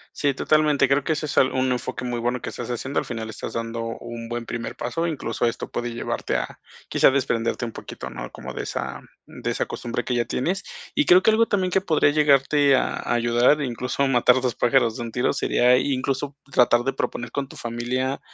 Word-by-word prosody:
Sí, 145 Hz, -1 st, +1 dB
totalmente. 150 Hz, -1 st, +3 dB
Creo 140 Hz, 0 st, +2 dB
que 160 Hz, -, +2 dB
eso 155 Hz, 0 st, -3 dB
es 145 Hz, -, -5 dB
al 130 Hz, -, +4 dB
un 130 Hz, 0 st, +1 dB
enfoque 125 Hz, 0 st, -3 dB
muy 120 Hz, -1 st, -2 dB
bueno 120 Hz, +1 st, -1 dB
que -, -, -4 dB
estás -, -, -6 dB
haciendo, 130 Hz, +3 st, -2 dB
al -, -, -4 dB
final 115 Hz, -2 st, -5 dB
estás 110 Hz, -, -6 dB
dando 115 Hz, 0 st, -3 dB, 0.2 s
un 120 Hz, -1 st, -7 dB
buen 120 Hz, 0 st, -4 dB
primer 120 Hz, 0 st, -5 dB
paso, 165 Hz, +8 st, -2 dB
incluso 155 Hz, -6 st, -2 dB
esto 115 Hz, -, -4 dB
puede 120 Hz, 0 st, -3 dB
llevarte 120 Hz, -, -3 dB
a -, -, -3 dB, 0.3 s
quizá -, -, +5 dB
desprenderte 125 Hz, -3 st, 0 dB
un 115 Hz, -, -3 dB
poquito, 65 Hz, -, -8 dB
¿no?, -, -, -7 dB
como -, -, -8 dB
de -, -, -4 dB
esa 65 Hz, +1 st, -4 dB, 0.3 s
de -, -, -6 dB
esa -, -, -1 dB
costumbre 120 Hz, 0 st, -4 dB
que 125 Hz, -, -2 dB
ya 120 Hz, -1 st, +1 dB
tienes. 175 Hz, -, -1 dB, 0.3 s
Y 300 Hz, -, +3 dB
creo 180 Hz, +1 st, +6 dB
que -, -, +5 dB
algo 225 Hz, +1 st, +4 dB
también 185 Hz, -3 st, 0 dB
que 190 Hz, -, +3 dB
podría 160 Hz, -6 st, +3 dB
llegarte 145 Hz, -1 st, +4 dB
a -, -, +3 dB, 0.2 s
a -, -, -2 dB
ayudar, 120 Hz, +5 st, +3 dB
incluso 125 Hz, +1 st, -1 dB
matar 125 Hz, 0 st, +4 dB
dos 125 Hz, -2 st, 0 dB
pájaros 120 Hz, -2 st, +2 dB
de 120 Hz, -, -4 dB
un 115 Hz, -, -6 dB
tiro, 125 Hz, -, +1 dB
sería 125 Hz, +1 st, +3 dB
incluso 135 Hz, +1 st, -1 dB, 0.2 s
tratar 120 Hz, -2 st, +4 dB
de 135 Hz, -, 0 dB
proponer 120 Hz, -3 st, -4 dB
con 140 Hz, +1 st, -3 dB
tu -, -, -13 dB
familia, 125 Hz, +3 st, -2 dB
125 Hz, 220 wpm, -24 LUFS, 120-140 Hz, 0.3 s, creo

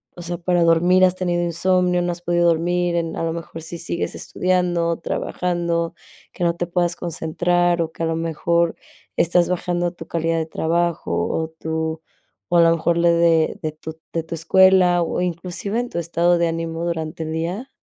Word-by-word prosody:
o 175 Hz, -, -9 dB
sea, 175 Hz, 0 st, -4 dB
¿para 175 Hz, 0 st, +1 dB
dormir 175 Hz, +3 st, +5 dB
has 185 Hz, 0 st, +1 dB
tenido 175 Hz, -2 st, -1 dB
insomnio, 180 Hz, +1 st, +1 dB
no 175 Hz, 0 st, 0 dB
has 175 Hz, -, -11 dB
podido 175 Hz, 0 st, +2 dB
dormir 175 Hz, +1 st, +1 dB
en 165 Hz, -1 st, -1 dB
a -, -, -2 dB
lo 165 Hz, -, 0 dB
mejor 165 Hz, -1 st, -7 dB
sí 165 Hz, +2 st, -6 dB
sigues 170 Hz, 0 st, -3 dB
estudiando, 175 Hz, -2 st, 0 dB
trabajando, 170 Hz, -1 st, -2 dB, 0.4 s
que -, -, -4 dB
no 170 Hz, 0 st, +1 dB
te 175 Hz, 0 st, -3 dB
puedas 175 Hz, 0 st, 0 dB
concentrar, 175 Hz, +1 st, 0 dB
o 160 Hz, -1 st, -2 dB
que -, -, -5 dB
a -, -, +2 dB
lo 165 Hz, -, -1 dB
mejor, 165 Hz, +1 st, 0 dB, 0.4 s
estás 175 Hz, +1 st, +3 dB
bajando 175 Hz, -1 st, -1 dB
tu 165 Hz, -2 st, -10 dB
calidad 165 Hz, 0 st, -1 dB
de 160 Hz, -, -1 dB
trabajo, 170 Hz, -, -1 dB, 0.2 s
o 160 Hz, 0 st, -2 dB
tu 160 Hz, 0 st, -3 dB, 0.5 s
o -, -, +5 dB
a 170 Hz, -, +7 dB
lo 165 Hz, -, +5 dB
mejor 170 Hz, +1 st, 0 dB
lo 170 Hz, 0 st, +3 dB
de 170 Hz, -1 st, +3 dB
de 155 Hz, -, -2 dB
tu 160 Hz, +1 st, -9 dB, 0.2 s
de 165 Hz, -1 st, -1 dB
tu 165 Hz, +1 st, -6 dB
escuela, 185 Hz, +1 st, +5 dB
o 170 Hz, -, -2 dB
inclusive 180 Hz, +5 st, -2 dB
en 245 Hz, 0 st, -3 dB
tu 170 Hz, -, -3 dB
estado 170 Hz, +1 st, +2 dB
de 170 Hz, -, +2 dB
ánimo 165 Hz, 0 st, -3 dB
durante 160 Hz, -1 st, -3 dB
el 155 Hz, -, -5 dB
día? 180 Hz, +11 st, -4 dB
170 Hz, 195 wpm, -21 LUFS, 165-175 Hz, 0.5 s, a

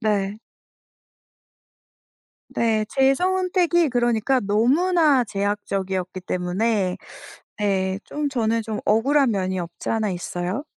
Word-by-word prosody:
네. 205 Hz, -1 st, -1 dB, 2.1 s
네, 220 Hz, -2 st, +1 dB
제 270 Hz, 0 st, +3 dB
선택이 360 Hz, -1 st, +1 dB
그러니까 240 Hz, +1 st, +1 dB
너무나 275 Hz, -, +3 dB
제약적이었기 195 Hz, -3 st, -3 dB
때문에 185 Hz, +2 st, -1 dB, 0.6 s
네, 190 Hz, -2 st, 0 dB
좀 295 Hz, 0 st, -3 dB
저는 230 Hz, -4 st, 0 dB
좀 215 Hz, -1 st, -4 dB
억울한 270 Hz, +5 st, +3 dB
면이 190 Hz, -3 st, -1 dB
없지 170 Hz, -1 st, -7 dB
않아 220 Hz, -2 st, 0 dB
있어요. 180 Hz, +6 st, -4 dB
220 Hz, 215 characters per minute, -23 LUFS, 195-270 Hz, 2.1 s, 제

